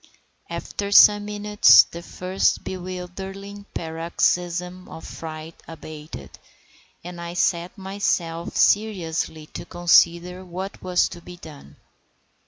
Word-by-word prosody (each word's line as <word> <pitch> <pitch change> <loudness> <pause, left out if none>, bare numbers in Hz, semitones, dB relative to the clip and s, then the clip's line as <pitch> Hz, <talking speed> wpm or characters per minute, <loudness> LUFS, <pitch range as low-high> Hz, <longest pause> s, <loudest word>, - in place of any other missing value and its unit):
After 200 0 -5
some 205 0 +7
minutes 210 0 +6
the 170 - -10
first 185 +2 -1
bewildering 190 +2 -7
paroxysm 175 +2 -2
of 160 - -10
fright 160 0 -8
abated, 155 - -10 0.6
and 175 0 -8
I 170 0 -6
set 175 -1 0
myself 190 -4 -2
seriously 170 -7 +1
to - - -6
consider 175 +1 +2
what 185 +2 -7
was 180 -1 +2
to 175 - -10
be 180 +1 -11
done. 145 - -13
180 Hz, 105 wpm, -23 LUFS, 165-190 Hz, 0.6 s, some